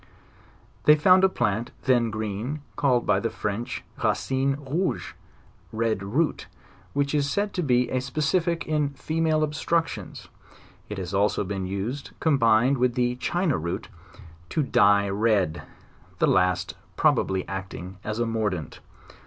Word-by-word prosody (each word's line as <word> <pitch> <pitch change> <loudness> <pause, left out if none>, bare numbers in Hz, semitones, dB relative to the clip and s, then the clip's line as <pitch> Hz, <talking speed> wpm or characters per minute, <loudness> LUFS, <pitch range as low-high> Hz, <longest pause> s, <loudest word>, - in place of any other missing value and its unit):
They 150 - +8
found 185 +5 +5
a 190 - +6
plant, 115 - -1
then 120 -3 +3
green, 110 +6 -4
called 130 -3 +2
by - - +3
the 115 - -1
French 110 +4 -4 0.2
"racine 135 +5 +1
rouge," 150 +6 -2 0.6
(red 110 -2 0
root,) 130 +12 -1 0.5
which 140 0 0
is 145 -1 +1
said 205 +6 -1
to 180 - -1
be 125 -5 +2
a 130 - 0
specific 165 +5 0
in 150 -2 0
female 160 +1 0
obstructions; 160 +2 -2 0.6
it 105 - -5
has 90 -1 -5
also 100 +1 +2
been 95 -1 -3
used, 105 +9 -4
combined 125 -3 +3
with 125 -1 +2
the 125 0 +1
china 175 +1 0
root, 85 +2 -4 0.6
to 155 - 0
dye 100 -5 +4
red, 100 -5 +1 0.6
the - - +3
last 90 -1 +2 0.2
pro - - +5
bably 95 -1 -1
acting 95 -1 -6
as 110 0 -3
a 120 - +1
mordant. 105 -8 -2
120 Hz, 140 wpm, -25 LUFS, 100-150 Hz, 0.6 s, They